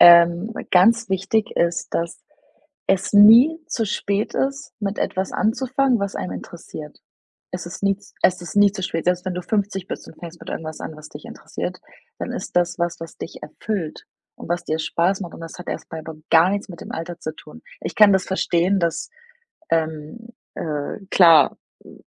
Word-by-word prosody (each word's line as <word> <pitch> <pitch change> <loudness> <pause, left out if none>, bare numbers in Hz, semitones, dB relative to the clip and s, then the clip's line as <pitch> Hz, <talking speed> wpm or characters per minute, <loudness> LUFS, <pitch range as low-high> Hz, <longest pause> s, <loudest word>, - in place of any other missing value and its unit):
ähm, 170 +4 +7 0.2
ganz 225 +5 +5
wichtig 200 +4 0
ist, 170 0 0
dass 170 0 -2 0.7
es 190 +1 +1
nie 230 +10 +8
zu 225 - -1
spät 200 +1 -1
ist, 275 +2 -2
mit 205 0 -2
etwas 190 0 -1
anzufangen, 260 +2 +1
was 200 0 -3
einen - - -4
interessiert. 155 -3 -9 0.5
Es 180 -1 -5
ist 175 - -8
nie 195 -1 +2
z 205 - -20
es 180 -1 +3
ist 175 - -8
nie 205 -1 +6
zu 190 -3 -5
spät. 165 -2 -2
Selbst 180 +1 +1
wenn 185 - -1
du 180 - -4
50 195 -2 -1
bist - - -6
und - - -14
fängst 170 -1 -9
mit - - -9
irgendwas 155 -1 -5
an, 155 - -6
was 155 0 -11
dich - - -11
interessiert, - - -6 0.4
dann - - -4
ist - - -6
das 175 0 +2
was, 170 -1 -1
was 165 0 -9
dich - - -8
erfüllt 195 -8 -4 0.3
und - - -10
was 175 0 -1
dir 155 -1 -1
Spaß 175 +5 0
macht 175 -3 -6
und - - -11
das 165 +1 -9
hat 180 - -9
erst - - -5
mal 160 - -4
aber 160 +1 -8 0.2
gar 165 +3 +6
nichts 200 +1 -2
mit 175 -3 -10
dem - - -8
Alter 165 +1 -5
zu 155 0 -5
tun. 80 - -14 0.2
Ich - - -5
kann 210 -2 +8
das 190 -1 +2
verstehen, 190 0 +1
dass, 170 - -1 0.6
ähm, 160 +7 -2 0.3
äh, 150 0 -3
klar, 165 -6 +6 0.3
hm, - - -15
180 Hz, 195 wpm, -22 LUFS, 165-205 Hz, 0.7 s, nie